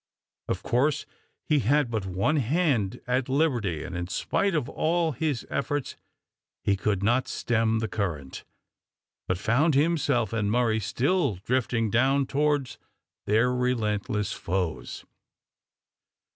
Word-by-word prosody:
Of - - -2
course 135 +5 +1 0.4
he 150 -2 +3
had 135 +1 +2
but 105 -4 -2
one 95 - +1
hand 125 - +1
at 125 +1 0
liberty, 120 - +1
and 90 - -6
in 85 0 -3
spite 195 - 0
of 145 -5 0
all 165 +2 0
his 145 -3 -2
efforts 145 0 -2 0.7
he 100 - +2
could 100 0 -1
not 120 +5 +2
stem 115 -1 0
the 110 0 -1
current, 85 -10 -4 0.8
but 90 - 0
found 135 - +2
himself 140 -6 +2
and 105 -3 0
Murray 115 -1 +2
still 140 - +1
drifting 115 -3 0
down 135 +3 +3
towards 145 -1 0 0.5
their 115 +4 +3
relentless 110 -5 -1
foes. 90 -2 -3
120 Hz, 125 wpm, -27 LUFS, 105-145 Hz, 0.8 s, he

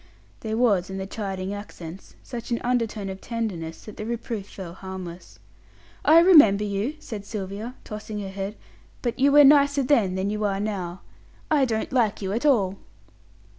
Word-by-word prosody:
There 220 0 -3
was 205 -7 +2
in 190 - -5
the 190 - -3
chiding 195 -1 -4
accents 190 -3 -9
such 240 -3 -7
an 235 - 0
undertone 230 -4 -1
of 190 0 -6
tenderness, 190 -9 -4
that 215 - -10
the 215 - -5
reproof 230 -3 -4
fell 180 -4 -8
harmless. 185 -2 -8 0.7
"I 315 - +7
remember 290 - +7
you," 210 +8 -2
said 215 -8 -7
Sylvia, 205 +3 -6
tossing 215 0 -6
her 195 - -5
head; 195 +2 -5 0.5
"but 240 0 -2
you 280 +2 +5
were 290 +1 +8
nicer 285 0 +5
then 225 -9 +2
than 190 +2 -1
you 210 0 -2
are 195 -1 0
now. 190 -4 -3 0.5
I 290 -3 +4
don't 225 0 -2
like 225 -5 +2
you 195 -2 -3
at 240 +7 +1
all." 200 -8 +2
210 Hz, 170 wpm, -25 LUFS, 195-240 Hz, 0.7 s, were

